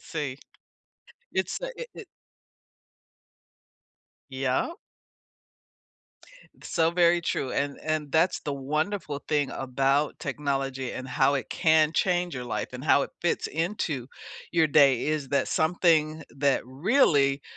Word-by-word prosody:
See, 145 Hz, -5 st, -4 dB, 1.0 s
it's, -, -, -1 dB
uh, -, -, -3 dB
it 485 Hz, -, -7 dB
it -, -, -9 dB, 2.3 s
Yeah. 130 Hz, -, -1 dB, 1.9 s
So 165 Hz, -1 st, +1 dB
very 175 Hz, 0 st, +4 dB
true, 135 Hz, -5 st, -2 dB
an 140 Hz, 0 st, -2 dB
and 155 Hz, -2 st, -2 dB
that's 165 Hz, +3 st, +3 dB
the 145 Hz, -, -4 dB
wonderful 150 Hz, +3 st, -2 dB
thing 145 Hz, -3 st, +1 dB
about 135 Hz, +3 st, 0 dB
technology 135 Hz, -2 st, -2 dB
and 130 Hz, 0 st, -6 dB
how 135 Hz, +2 st, +2 dB
it 135 Hz, -, -3 dB
can 155 Hz, -2 st, +3 dB
change 175 Hz, -1 st, +1 dB
your 125 Hz, -, -5 dB
life 120 Hz, -, -3 dB
and 125 Hz, +3 st, -7 dB
how 140 Hz, -, +4 dB
it -, -, -5 dB
fits 175 Hz, -, 0 dB
into 160 Hz, -, -2 dB, 0.5 s
your 165 Hz, -2 st, +3 dB
day, 140 Hz, -4 st, +4 dB
is 150 Hz, -3 st, -1 dB
that 140 Hz, -, +1 dB
something 160 Hz, -2 st, +2 dB
that 140 Hz, -1 st, +2 dB
really 140 Hz, -, +2 dB
150 Hz, 125 wpm, -27 LUFS, 135-165 Hz, 2.3 s, very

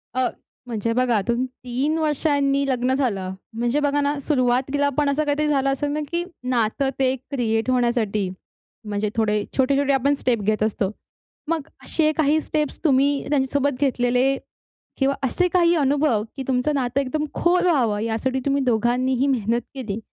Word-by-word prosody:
अ, 255 Hz, -1 st, +2 dB, 0.4 s
म्हणजे 230 Hz, -1 st, -2 dB
बघा 245 Hz, -3 st, +2 dB
तुम्ही 240 Hz, +2 st, +1 dB, 0.2 s
3 260 Hz, +6 st, -1 dB
वर्षांनी 285 Hz, -2 st, +1 dB
लग्न 255 Hz, 0 st, +1 dB
झालं. 200 Hz, -9 st, -1 dB, 0.2 s
म्हणजे 240 Hz, +5 st, 0 dB
बघा 290 Hz, 0 st, +1 dB
ना 285 Hz, +1 st, 0 dB
सुरुवातीला 270 Hz, +1 st, +1 dB
पण 295 Hz, -1 st, +2 dB
असं 290 Hz, +2 st, +1 dB
काहीतरी 295 Hz, +1 st, 0 dB
झालं 275 Hz, -2 st, +2 dB
असेल 280 Hz, +2 st, -1 dB
ना, 300 Hz, -, -1 dB
की 340 Hz, +1 st, 0 dB, 0.3 s
नातं 245 Hz, +3 st, +1 dB
ते 260 Hz, 0 st, +2 dB
क्रिएट 240 Hz, -3 st, -2 dB
होण्यासाठी, 235 Hz, -5 st, +1 dB, 0.6 s
म्हणजे 210 Hz, 0 st, -1 dB
थोडे 210 Hz, -2 st, +1 dB
छोटे-छोटे 275 Hz, +1 st, +2 dB
आपण 275 Hz, +2 st, +2 dB
स्टेप 235 Hz, -4 st, +1 dB
घेत 215 Hz, +1 st, +1 dB
असतो. 210 Hz, -2 st, 0 dB, 0.6 s
मग 320 Hz, -4 st, -1 dB, 0.2 s
असे 310 Hz, -1 st, +1 dB
काही 310 Hz, 0 st, +3 dB
स्टेप्स 300 Hz, -1 st, -2 dB
तुम्ही 280 Hz, -1 st, +2 dB
त्यांच्यासोबत 280 Hz, -1 st, 0 dB
घेतलेले 255 Hz, 0 st, +2 dB, 0.6 s
किंवा 275 Hz, 0 st, +1 dB
असे 360 Hz, +8 st, +1 dB
काही 345 Hz, -1 st, +4 dB
अनुभव, 280 Hz, -6 st, +2 dB
की 265 Hz, -, -3 dB
तुमचं 260 Hz, +3 st, +1 dB
नातं 260 Hz, 0 st, 0 dB
एकदम 295 Hz, +3 st, -2 dB
खोल 355 Hz, +1 st, +2 dB
व्हावं, 235 Hz, -11 st, +2 dB
यासाठी 230 Hz, +4 st, -1 dB
तुम्ही 280 Hz, 0 st, +1 dB
दोघांनीही 250 Hz, +3 st, +1 dB
मेहनत 235 Hz, -3 st, +1 dB
केली? 225 Hz, -5 st, -4 dB
265 Hz, 155 wpm, -23 LUFS, 240-285 Hz, 0.6 s, काही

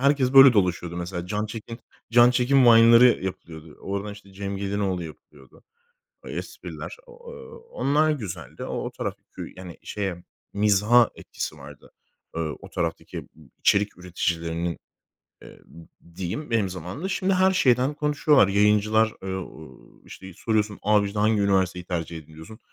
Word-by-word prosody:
Herkes 140 Hz, -1 st, +2 dB
böyle 135 Hz, -1 st, +9 dB
dolaşıyordu, 90 Hz, -4 st, 0 dB
mesela. 90 Hz, 0 st, -5 dB
Can 105 Hz, +2 st, -2 dB
Çekin 115 Hz, +2 st, -8 dB, 0.3 s
Can 120 Hz, +1 st, +6 dB
Çekin 125 Hz, +1 st, +3 dB
Vine'ları 115 Hz, -1 st, +6 dB
yapılıyordu. 80 Hz, -4 st, -8 dB
Oradan, 100 Hz, +1 st, -4 dB
işte, 100 Hz, -1 st, -15 dB
Cem 100 Hz, 0 st, -5 dB
Gelinoğlu 100 Hz, -3 st, -2 dB
yapılıyordu. 75 Hz, -3 st, -15 dB, 0.6 s
Espriler, -, -, -7 dB
o 480 Hz, -, -16 dB, 0.2 s
e -, -, -10 dB
o 470 Hz, 0 st, -12 dB
onlar 155 Hz, -, +1 dB
güzeldi. 110 Hz, -, -6 dB
O -, -, -5 dB
o -, -, -5 dB
taraf -, -, -4 dB, 0.2 s
kü -, -, -9 dB
yani, 90 Hz, -2 st, -10 dB
şeye 95 Hz, -4 st, -4 dB, 0.3 s
mizaha 105 Hz, +3 st, +4 dB
etkisi 75 Hz, -, -7 dB
vardı, 75 Hz, 0 st, -14 dB, 0.4 s
eee, 85 Hz, -, -2 dB, 0.2 s
o -, -, -11 dB
taraftaki, -, -, -4 dB
ıb -, -, -11 dB, 0.3 s
içerik 100 Hz, -2 st, +2 dB
üreticilerinin, 85 Hz, -1 st, -3 dB, 0.6 s
eee, -, -, -13 dB
ı -, -, -14 dB
ı 85 Hz, 0 st, -18 dB
diyeyim 95 Hz, -, -5 dB
benim 105 Hz, -5 st, +1 dB
zamanımda. 90 Hz, -, -6 dB
Şimdi 190 Hz, +1 st, 0 dB
her 190 Hz, +1 st, +3 dB
şeyden 130 Hz, -5 st, +2 dB
konuşuyorlar. 150 Hz, -5 st, +3 dB
Yayıncılar 105 Hz, +2 st, +3 dB
e -, -, -9 dB
o 80 Hz, -7 st, -7 dB, 0.3 s
e -, -, -26 dB
işte 95 Hz, -1 st, -11 dB
soruyorsun, 105 Hz, -1 st, -1 dB
"Abi, 105 Hz, 0 st, +3 dB
işte 105 Hz, +1 st, -4 dB
hangi 105 Hz, 0 st, +2 dB
üniversiteyi 95 Hz, -3 st, +1 dB
tercih 85 Hz, -2 st, -4 dB
ediliyorsun?" 80 Hz, +8 st, -13 dB
100 Hz, 155 wpm, -24 LUFS, 90-120 Hz, 0.6 s, böyle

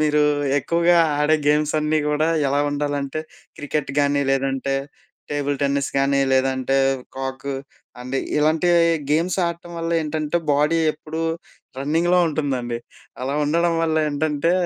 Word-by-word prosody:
మీరూ 150 Hz, -1 st, +3 dB, 0.4 s
ఎక్కువగా 170 Hz, +4 st, +2 dB, 0.2 s
ఆడే 155 Hz, +1 st, +3 dB
గేమ్స్ 150 Hz, 0 st, +2 dB
అన్నీ 155 Hz, +1 st, +1 dB
గూడా 150 Hz, +2 st, +1 dB, 0.2 s
ఎలా 140 Hz, +1 st, +1 dB
ఉండాలంటే, 145 Hz, 0 st, -2 dB, 0.4 s
క్రికెట్‌గాని 145 Hz, -1 st, 0 dB
లేదంటే 135 Hz, 0 st, 0 dB, 0.6 s
టేబుల్ 145 Hz, -1 st, -1 dB
టెన్నిస్ 140 Hz, 0 st, +1 dB
కానీ 140 Hz, 0 st, +2 dB
లేదంటే 130 Hz, 0 st, +1 dB, 0.4 s
కాక్. 135 Hz, +1 st, -5 dB, 0.5 s
అంటే 130 Hz, +2 st, -3 dB, 0.2 s
ఇలాంటివి 160 Hz, +3 st, +3 dB, 0.3 s
గేమ్స్ 170 Hz, +5 st, +1 dB
ఆడటం 170 Hz, 0 st, -6 dB
వల్ల 165 Hz, 0 st, -3 dB
ఏంటంటే, 155 Hz, +1 st, -2 dB, 0.2 s
బాడీ 150 Hz, +3 st, +2 dB
ఎప్పుడూ 155 Hz, +1 st, -6 dB, 0.6 s
రన్నింగ్‌లో 165 Hz, +6 st, +2 dB
ఉంటుందండి. 130 Hz, -6 st, -2 dB, 0.4 s
అలా 135 Hz, +2 st, -2 dB
ఉండడం 170 Hz, +2 st, +2 dB
వల్ల 160 Hz, -1 st, +1 dB
ఏంటంటే, 150 Hz, +2 st, 0 dB
150 Hz, 120 wpm, -22 LUFS, 140-160 Hz, 0.6 s, మీరూ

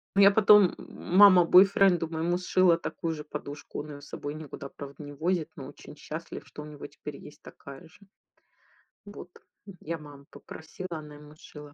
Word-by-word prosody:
Ну, 200 Hz, -, +4 dB
я 200 Hz, +1 st, +8 dB
потом, 210 Hz, -2 st, +5 dB
м 180 Hz, -, -5 dB
мама 190 Hz, -3 st, +8 dB
бойфренду 185 Hz, -2 st, +5 dB
моему 165 Hz, +2 st, -1 dB
сшила 180 Hz, -1 st, +3 dB
такую 165 Hz, -1 st, -4 dB
же 150 Hz, -, -8 dB
подушку, 145 Hz, -1 st, -8 dB
он 150 Hz, -, -7 dB
её 145 Hz, -1 st, -10 dB
с 145 Hz, -, -14 dB
собой 145 Hz, +1 st, -6 dB
никуда, 145 Hz, -2 st, -9 dB
правда, 140 Hz, +1 st, -11 dB
не 145 Hz, 0 st, -9 dB
возит, 165 Hz, +2 st, -2 dB
но -, -, -9 dB
очень -, -, -13 dB
счастлив, -, -, -8 dB
что 150 Hz, -, -10 dB
у -, -, -10 dB
него 150 Hz, -1 st, -10 dB
теперь 145 Hz, 0 st, -10 dB
есть 150 Hz, -, -14 dB
такая 140 Hz, -1 st, -13 dB
же. 160 Hz, -, -22 dB, 1.1 s
Вот. 205 Hz, -3 st, -11 dB, 0.4 s
М, 195 Hz, -3 st, -12 dB
я 165 Hz, +1 st, -5 dB
маму 145 Hz, -2 st, -14 dB
попросила, 185 Hz, +4 st, -10 dB
она 150 Hz, -1 st, -12 dB
ему 150 Hz, +1 st, -15 dB
сшила. 150 Hz, -1 st, -13 dB
160 Hz, 190 wpm, -27 LUFS, 145-180 Hz, 1.1 s, я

